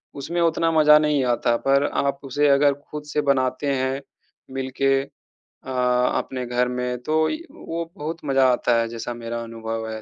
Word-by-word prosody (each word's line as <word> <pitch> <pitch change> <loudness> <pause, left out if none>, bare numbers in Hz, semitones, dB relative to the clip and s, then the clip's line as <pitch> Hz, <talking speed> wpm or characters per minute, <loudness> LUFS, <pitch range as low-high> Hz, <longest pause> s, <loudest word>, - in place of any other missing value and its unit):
उसमें 170 +5 -3
उतना 165 0 +2
मज़ा 150 -1 +7
नहीं 150 -3 +1
आता। 120 -1 +1
पर 140 +1 +4
आप 140 0 -1
उसे 145 +2 +1
अगर 140 +1 +4
ख़ुद 145 +1 -9
से 150 - +2
बनाते 130 +1 0
हैं, 130 +1 -1 0.5
मिल 135 0 -4
के 135 0 +4 0.6
अ, 130 - -7 0.5
अपने 130 -1 -3
घर 125 +1 0
में 125 0 -2
तो 155 +2 +1
य - - -2
वो 170 +1 -5
बहुत 160 +3 -5
मज़ा 135 -2 +3
आता 120 -1 +2
है 115 - -1
जैसा 115 +1 -5
मेरा 115 0 -5
अनुभव 115 -1 -5
है। 110 0 -6
135 Hz, 180 wpm, -23 LUFS, 125-150 Hz, 0.6 s, मज़ा